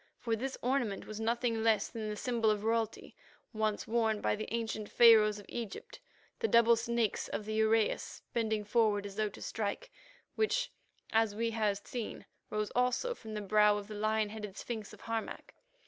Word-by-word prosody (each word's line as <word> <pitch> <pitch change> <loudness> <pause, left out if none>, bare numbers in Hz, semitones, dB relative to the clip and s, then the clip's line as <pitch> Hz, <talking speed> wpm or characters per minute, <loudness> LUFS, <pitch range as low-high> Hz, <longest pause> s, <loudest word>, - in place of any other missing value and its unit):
For 230 -2 -1
this 260 +4 -4
ornament 245 -6 0
was 215 0 -7
nothing 230 0 0
less 220 -2 +3
than 220 -2 -5
the 210 - -3
symbol 230 -1 +1
of 210 -1 0
royalty, 225 -1 -1 0.4
once 215 -1 -1
worn 220 -2 +1
by - - +1
the 215 +1 -6
ancient 220 -2 -3
Pharaohs 220 -3 +6
of 205 - -11
Egypt, 235 - -6 0.4
the 455 - +1
double 235 0 +6
snakes 230 -1 -1
of 210 - -4
the 215 - -3
uraeus 220 0 +1
bending 220 -3 0
forward 210 -1 +2
as 200 -1 -7
though 215 0 0
to - - -13
strike, 225 - -3 0.4
which, - - 0 0.4
as 220 -2 +2
we 230 +1 0
had 210 -3 -1
seen, 240 -3 -5 0.2
rose 215 0 -2
also 250 - +1
from 220 - -9
the 210 - -3
brow 210 +1 +4
of 205 -1 -6
the 215 - -7
lion 215 0 0
headed 210 -2 -7
sphinx 220 -4 -5
of - - -13
Harmac. 225 -1 -4
220 Hz, 180 wpm, -33 LUFS, 210-235 Hz, 0.4 s, Pharaohs